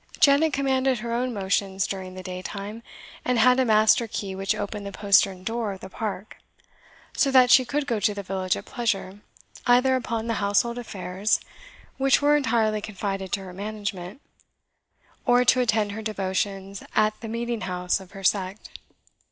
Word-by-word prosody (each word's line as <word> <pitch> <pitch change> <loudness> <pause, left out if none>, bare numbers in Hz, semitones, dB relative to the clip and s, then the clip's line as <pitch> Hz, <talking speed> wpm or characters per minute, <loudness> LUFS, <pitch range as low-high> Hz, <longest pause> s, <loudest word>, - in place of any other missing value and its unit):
Janet 295 +2 +5
commanded 265 -1 +1
her 235 0 -3
own 250 +2 -1
motions 195 -2 -1
during 185 -1 -6
the 185 - -8
daytime, 195 +4 -6 0.4
and 250 -1 +1
had 250 +3 +5
a 260 - +3
master 220 +1 +4
key 200 -2 -4
which 195 0 -1
opened 205 0 -4
the 200 - -6
postern 195 -2 +2
door 225 -1 -2
of 190 - -10
the 190 - -9
park, 210 -1 -5 0.8
so 275 - +3
that 255 -2 +6
she 255 0 +7
could 290 +3 -1
go 235 -6 -1
to 205 +1 +1
the 200 - -5
village 185 -1 -1
at - - -8
pleasure, 205 -5 -2 0.5
either 250 +2 +5
upon 230 -3 -2
the 230 - -1
household 235 +4 +1
affairs, 200 -2 -1 0.6
which 270 0 +4
were 295 +1 +4
entirely 225 -6 +1
confided 195 -2 -4
to 200 - 0
her 185 -1 -9
management, 205 +1 -5 1.0
or 245 0 +4
to 255 - +5
attend 220 -4 +1
her 220 +2 -6
devotions 195 -1 -3
at 215 0 +2
the 230 - -6
meeting 235 0 -3
house 180 0 -1
of 190 0 -14
her 195 -1 -9
sect. 190 +1 -1
215 Hz, 170 wpm, -25 LUFS, 195-240 Hz, 1.0 s, she